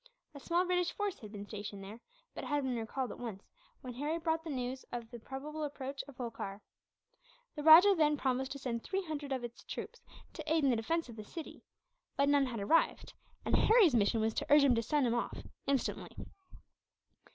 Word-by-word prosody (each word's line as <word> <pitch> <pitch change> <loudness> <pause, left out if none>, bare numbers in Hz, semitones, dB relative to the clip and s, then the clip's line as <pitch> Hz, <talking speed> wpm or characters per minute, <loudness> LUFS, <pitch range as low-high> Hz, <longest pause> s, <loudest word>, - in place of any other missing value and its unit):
A 285 - -9
small 345 +5 +1
British 360 -1 +1
force 410 -2 -2
had 210 -2 -10
been 205 -1 -7
stationed 205 -2 -7
there; 210 +4 -9 0.3
but - - -6
it - - -6
had 290 -1 0
been 260 -2 -1
recalled, 235 +3 -3
at - - -9
once, 220 -5 -7 0.3
when 250 -1 -7
Harry 295 +6 -2
brought 325 -1 -1
the 325 - -6
news 260 -1 -3
of 235 -1 -6
the 240 - -8
probable 295 +6 -6
approach 275 -1 -4
of 280 -3 -13
Holkar. 225 -5 -5 1.0
The 300 - -4
rajah 325 +6 +9
then 300 -3 +3
promised 265 -1 -1
to - - -7
send 240 -4 -3
three 385 +7 -2
hundred 300 -4 -5
of 260 -2 -1
his 240 0 -8
troops, - - -7 0.3
to 310 -2 -5
aid 320 -1 +3
in 275 - +4
the - - +3
defence 325 +9 -1
of 235 -2 -11
the 215 - -6
city; 320 +9 -9 0.6
but 280 +1 +3
none 285 -2 +4
had 235 -3 -4
arrived, 320 +12 +2 0.3
and - - +2
Harry's 435 - +6
mission 225 0 +3
was 220 0 +1
to - - -3
urge 295 0 +8
him 275 -3 +5
to 230 - +2
send 290 +4 +1
them 235 - +1
off, 240 - -2 0.3
instantly. 275 -2 -1
270 Hz, 210 wpm, -33 LUFS, 235-310 Hz, 1.0 s, rajah